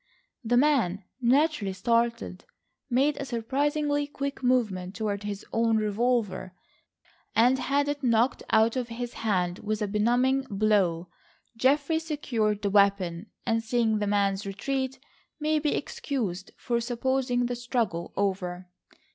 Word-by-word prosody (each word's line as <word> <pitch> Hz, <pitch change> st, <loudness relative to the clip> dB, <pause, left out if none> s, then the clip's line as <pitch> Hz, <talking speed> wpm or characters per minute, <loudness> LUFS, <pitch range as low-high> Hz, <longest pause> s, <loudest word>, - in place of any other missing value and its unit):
The 240 Hz, +1 st, +2 dB
man, 245 Hz, -9 st, +2 dB, 0.2 s
naturally 255 Hz, -4 st, +2 dB
startled, 230 Hz, -1 st, 0 dB, 0.4 s
made 275 Hz, +4 st, +2 dB
a 280 Hz, -, -4 dB
surprisingly 290 Hz, +4 st, 0 dB
quick 280 Hz, -1 st, -5 dB
movement 210 Hz, -8 st, 0 dB
toward 205 Hz, -3 st, -2 dB
his 205 Hz, -1 st, -5 dB
own 225 Hz, -1 st, +2 dB
revolver, 215 Hz, -3 st, 0 dB, 0.8 s
and 250 Hz, +4 st, +4 dB
had 285 Hz, +2 st, +1 dB
it 290 Hz, 0 st, -2 dB
knocked 240 Hz, 0 st, +2 dB
out 220 Hz, +2 st, +4 dB
of 250 Hz, -2 st, -2 dB
his 240 Hz, +1 st, -5 dB
hand 180 Hz, -5 st, 0 dB
with 215 Hz, 0 st, -2 dB
a 210 Hz, -, -1 dB
benumbing 245 Hz, +6 st, +2 dB
blow. 195 Hz, -5 st, +1 dB, 0.5 s
Geoffrey 285 Hz, +6 st, +2 dB
secured 230 Hz, -10 st, -1 dB
the 200 Hz, -, 0 dB
weapon, 200 Hz, -2 st, +2 dB, 0.2 s
and 225 Hz, 0 st, +1 dB
seeing 225 Hz, -2 st, +1 dB
the 205 Hz, -, -1 dB
man's 200 Hz, -1 st, +1 dB
retreat, 265 Hz, +6 st, -3 dB, 0.4 s
may 310 Hz, 0 st, +1 dB
be 300 Hz, 0 st, 0 dB
excused 215 Hz, -11 st, -3 dB
for 235 Hz, -1 st, -1 dB
supposing 245 Hz, +1 st, 0 dB
the 245 Hz, 0 st, -2 dB
struggle 235 Hz, -8 st, -2 dB
over. 185 Hz, -2 st, -2 dB
230 Hz, 130 wpm, -27 LUFS, 200-265 Hz, 0.8 s, and